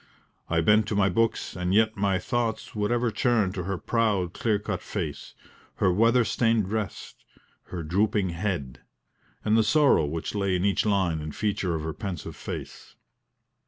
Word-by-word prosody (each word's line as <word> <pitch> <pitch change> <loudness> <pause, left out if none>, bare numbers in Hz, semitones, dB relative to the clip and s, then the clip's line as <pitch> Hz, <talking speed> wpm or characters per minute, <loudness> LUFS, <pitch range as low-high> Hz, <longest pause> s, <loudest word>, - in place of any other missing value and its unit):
I 85 0 +2
bent 105 +5 +4
to 105 - -2
my 100 -1 +3
books, 115 +4 0
and 90 +1 -1
yet 110 0 +3
my 100 -2 +1
thoughts 115 +2 -2
would 105 +1 -1
ever 120 -1 +1
turn 115 -6 +1
to 90 -2 -4
her 95 0 -2
proud 100 -5 0
clear 110 -3 +1
cut 105 - -4
face, - - -5 0.4
her 95 - +2
weather 115 +4 +4
stained 115 -2 +2
dress, 105 +1 -4 0.5
her 85 -2 -6
drooping 100 +4 +1
head, 85 -8 -3 0.6
and 110 0 +3
the 110 - +5
sorrow 135 - +4
which 80 +2 -4
lay 100 -2 0
in 90 +2 0
each 100 +2 +1
line 95 -6 +1
and 75 -1 -6
feature 100 -5 -1
of 80 - -4
her 80 0 -3
pensive 90 -4 -6
face. - - -8
100 Hz, 170 wpm, -26 LUFS, 90-110 Hz, 0.6 s, the